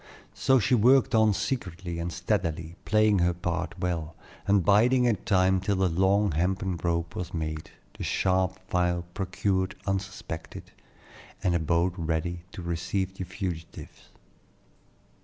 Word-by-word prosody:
So 130 +2 +3
she 130 +2 +1
worked 125 +3 +5
on 110 -1 +5
secretly 90 -6 -3
and 85 +1 -3
steadily, 80 +1 -2
playing 110 -2 +3
her 85 0 +2
part 90 +1 -3
well, 85 -3 -3 0.3
and 100 -3 +3
biding 120 +6 +5
her 120 -2 +4
time 95 -1 +2
till 100 +2 0
the 95 0 +2
long 95 +4 +2
hempen 90 +3 0
rope 85 -1 -1
was 90 0 -5
made, 80 -1 -4 0.3
the - - -6
sharp 95 0 +1
file 90 -1 0
procured 95 0 -1
unsuspected, 95 -4 -5 0.7
and 90 -3 +2
a 85 - +2
boat 85 +3 +1
ready 85 +1 -2
to 90 - -7
receive 90 +3 -2
the 95 -1 -6
fugitives. 90 -3 -7
90 Hz, 140 wpm, -27 LUFS, 85-100 Hz, 0.7 s, worked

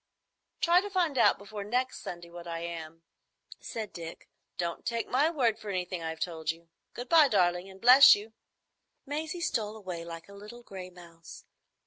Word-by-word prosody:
"Try 345 +2 +5
to 410 - -6
find 355 -7 0
out 250 - +4
before 205 0 -7
next 250 +5 -1
Sunday 175 -1 -8
what 175 0 -10
I 165 0 -4
am," 165 -1 -7 0.6
said 220 -2 -6
Dick. 165 -1 -9 0.3
"Don't 170 -1 -3
take 230 -1 -2
my 285 +5 +2
word 250 -9 +1
for 210 - -8
anything 180 -2 -3
I've 160 0 -5
told 160 -3 -4
you. 165 0 -4 0.3
Good 245 +1 -6
bye, 315 -1 +7
darling, 180 -4 +1
and 190 0 -13
bless 250 +5 +9
you." 215 +2 -9 0.7
Maisie 310 +4 -4
stole 220 -8 -1
away 180 -5 -6
like 165 -1 -9
a 200 - -14
little 210 +4 -11
gray 185 -4 -8
mouse. 170 -2 -14
200 Hz, 175 wpm, -29 LUFS, 170-245 Hz, 0.7 s, bless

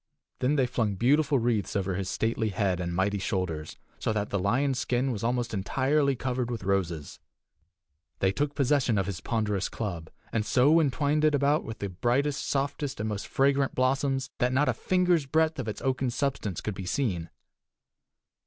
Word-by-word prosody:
Then 135 +4 +2
they 135 -3 +3
flung 115 -5 -1
beautiful 140 +7 +3
wreaths 115 -4 0
over 95 -1 0
his 95 0 -3
stately 110 +1 0
head 95 -2 0
and 85 -1 -2
mighty 100 +2 +1
shoulders, 90 -5 -3 0.2
so - - 0
that 105 -1 -2
the 100 - 0
lion's 125 +7 +1
skin 125 +2 0
was 110 -3 -4
almost 120 0 -1
entirely 135 +8 +1
covered 125 -1 -2
with 115 -5 -4
roses. 90 -6 -2 1.0
They 95 - +2
took 145 +6 -1
possession 135 -5 +2
of 95 - +1
his 100 -3 -5
ponderous 105 -4 -1
club, 85 -8 -5 0.2
and 115 - +1
so 140 +9 +4
entwined 150 0 +1
it 155 -1 +4
about 145 +2 +2
with 110 - -6
the 100 - -4
brightest, 125 +10 0
softest, 140 -1 -2
and 105 - -1
most 105 -1 -4
fragrant 135 0 +2
blossoms 135 +1 +1
that 125 -1 +2
not 140 +2 +2
a 130 - +3
finger's 180 +2 +1
breadth 160 +1 +1
of 125 - -3
its 105 - -5
oaken 130 -1 0
substance 120 - -2
could 105 - -3
be 95 -2 -7
seen. 90 -10 -1
120 Hz, 180 wpm, -28 LUFS, 100-140 Hz, 1.0 s, so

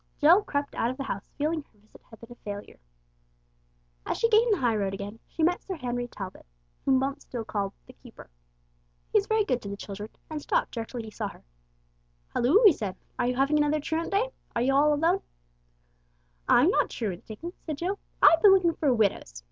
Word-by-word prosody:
Jill 335 +7 +6
crept 285 -7 -3
out 230 - 0
of 255 - -5
the 275 - -3
house 200 -7 -5
feeling 310 +2 0
her 230 - -28
visit 210 +1 -20
had 225 - -14
been 230 +1 -13
a 240 - -14
failure. 205 0 -7 1.2
As - - -2
she 460 - +2
gained 455 +1 +4
the 410 - +3
high 240 -7 +1
road 195 -2 -1
again, 205 +3 -7
she 325 - -3
met 355 +2 +2
Sir 380 - -5
Henry 245 -4 -3
Talbot, 190 - -9 0.4
whom 265 -1 +4
Bumps 275 +2 -2
still 235 -3 -5
called 200 -2 -2
the - - -14
"keeper." - - -14 0.9
He 425 - +6
was 400 - -4
very 440 -1 +2
good 250 -10 0
to 200 - -7
the 200 - -5
children, 205 +1 -7 0.2
and 310 -1 -5
stopped - - 0
directly 230 0 -5
he 220 - -9
saw 215 0 -3
her. - - -13 0.9
"Hulloo!" 310 - +4
he 395 - +9
said. 200 -8 -4 0.2
"Are - - +2
you 250 - 0
having 275 +3 +2
another 295 +1 +2
truant 320 +3 -2
day? 430 +5 +1 0.2
Are 235 - +1
you 270 +2 +2
all 295 +2 +4
alone?" 330 +6 +2 1.3
"I'm 290 +10 +5
not - - +2
truanting," 220 - -5
said 310 -3 -5
Jill. 375 +6 -2 0.2
"I've 330 0 +7
been 400 -2 +8
looking 345 -3 +2
for 295 -3 +1
widows. 205 - 0
270 Hz, 205 wpm, -27 LUFS, 220-330 Hz, 1.3 s, he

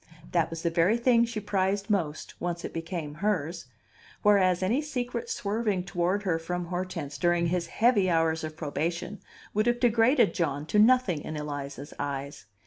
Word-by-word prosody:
That 170 -2 +2
was 165 0 -6
the 170 - +1
very 170 +7 +3
thing 235 -1 +4
she 230 -2 -4
prized 200 -1 0
most, 160 -7 -1
once 175 -1 -3
it - - -6
became 165 -2 -4
hers; 175 -6 -1 0.6
whereas, 190 -3 +4
any 230 +10 +2
secret 245 -5 -4
swerving 205 -2 -1
toward 185 +2 -1
her 170 -5 0
from 175 +2 -3
Hortense 170 -6 -4
during 175 0 +2
his 175 -1 -1
heavy 215 -2 +3
hours 165 -1 +1
of 155 0 -6
probation 165 +6 -3 0.3
would 215 +2 +1
have 240 0 +2
degraded 240 0 +4
John 145 -4 -1
to 210 +7 +1
nothing 220 -8 +4
in 155 - -5
Eliza's 145 -1 -6
eyes. 140 -6 -4
180 Hz, 165 wpm, -28 LUFS, 160-210 Hz, 0.6 s, thing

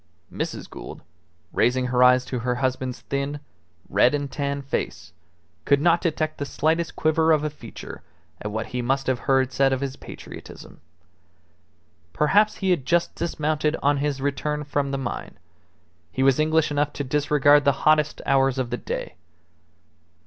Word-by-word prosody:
Mrs. - - -4
Gould, - - -10 0.5
raising 125 +1 +2
her 125 - +3
eyes 125 0 +6
to 125 - -3
her 125 +1 -1
husband's 130 -1 -2
thin, 140 +1 -3 0.5
red 115 +8 +3
and 145 -1 -3
tan 140 -1 -2
face, 90 -9 -4 0.5
could 140 -1 +3
not 170 +3 +3
detect 155 -2 -1
the - - -1
slightest 160 +4 0
quiver 160 +1 +2
of 155 -1 +3
a 150 - -1
feature 125 -6 -10 0.4
at 105 - -4
what 110 +1 -3
he 125 - -1
must 135 +3 0
have 130 -2 0
heard 135 -1 +3
said 135 0 +3
of 130 - 0
his 135 -1 -3
patriotism. - - -11 1.3
Perhaps 205 +8 +3
he 190 -2 0
had 170 -7 +1
just 170 +7 +1
dismounted 155 -2 -1
on 145 +1 +3
his 140 -1 -1
return 150 +2 -2
from 145 -1 -1
the 135 - -2
mine; 130 -3 -5 0.7
he 130 - -1
was 135 +1 +4
English 155 0 +2
enough 145 0 0
to 145 - -3
disregard 145 +1 +3
the 140 - +5
hottest 155 -1 +3
hours 135 -1 +3
of 125 -3 -2
the 120 - -1
day. - - -5
140 Hz, 165 wpm, -24 LUFS, 130-150 Hz, 1.3 s, eyes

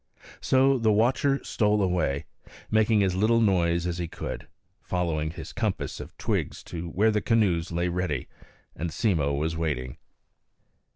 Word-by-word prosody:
So 135 0 +3
the 110 -2 +3
watcher 130 +6 +2
stole 105 -1 +1
away, 90 -7 0 0.5
making 110 -1 +4
as 95 -2 +1
little 110 +5 +3
noise 85 -5 +2
as 90 0 -2
he 85 - -2
could, - - -6 0.3
following 80 -4 -1
his 80 0 -8
compass 110 -5 -2
of - - -10
twigs - - -2
to 85 0 -4
where 105 +6 +3
the 105 -1 0
canoes 95 -8 +1
lay 85 +1 0
ready 85 -6 -2 0.5
and 85 +3 -3
Simmo 80 -6 +1
was 75 +3 -1
waiting. 70 -6 -3
90 Hz, 150 wpm, -27 LUFS, 80-110 Hz, 0.5 s, making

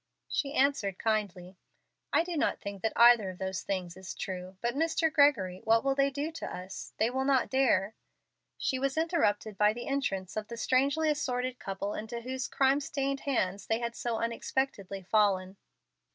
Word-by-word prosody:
She 280 0 -2
answered, 260 -9 +2
kindly, 195 -4 -2 0.5
"I - - +4
do 350 0 -4
not 295 - 0
think 200 -1 -7
that 225 - 0
either 235 -4 +6
of 185 - -8
those 190 0 -3
things 180 -3 -3
is 190 0 -8
true. 185 0 -6
But, 240 +2 -1
Mr. 320 +2 +1
Gregory, 215 - +3
what 225 0 +3
will 275 0 +2
they 275 0 +2
do 285 +3 -3
with 330 0 -9
us? 185 +2 -7
They 225 +2 +2
will 265 +1 0
not 270 -2 +2
dare 225 -7 +2 0.3
" - - -54
She 260 - -1
was 275 +2 -1
interrupted 225 - 0
by 210 0 +5
the 240 - -6
entrance 195 -10 -2
of 215 -1 -3
the 235 - -7
strangely 280 +6 +2
assorted 255 -3 -2
couple 195 +1 -4
into 220 +2 -5
whose 255 +1 -3
crime 270 +1 +3
stained 275 -1 -2
hands 200 -9 -1
they 225 - +2
had 235 0 -3
so 235 -2 -2
unexpectedly 230 -4 -2
fallen. 195 -1 +2
235 Hz, 180 wpm, -30 LUFS, 195-275 Hz, 0.5 s, either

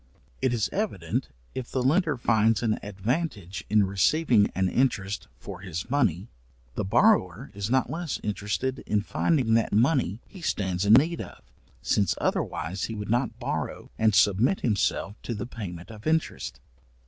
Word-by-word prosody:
It 130 - +2
is 115 -4 +1
evident, 100 - -2 0.2
if 130 -2 -5
the 130 - -1
lender 150 +1 +2
finds 115 -2 +2
an 110 -2 +1
advantage 100 - -3
in 105 -1 +4
receiving 105 - +3
an 95 0 +2
interest 100 -4 0
for 95 -3 -8
his 95 +3 -6
money, 110 - +1 0.5
the - - -2
borrower 120 - +2
is 100 +1 -4
not 130 +1 +2
less 165 -7 -3
interested 105 +6 -2
in 105 -1 +2
finding 130 +1 +1
that 115 0 +2
money 115 - +2
he 190 - -12
stands 95 - -1
in 105 - +6
need 160 +8 +4
of, - - -10 0.4
since 100 -5 +2
otherwise 95 +5 -1
he 115 - -5
would 105 0 -4
not 120 +3 0
borrow - - -4
and 110 -2 +3
submit 105 - +3
himself 105 -2 0
to 120 - -4
the 105 - -4
payment 100 -6 -7
of 105 +3 -9
interest. 160 0 -1
110 Hz, 160 wpm, -27 LUFS, 100-130 Hz, 0.5 s, in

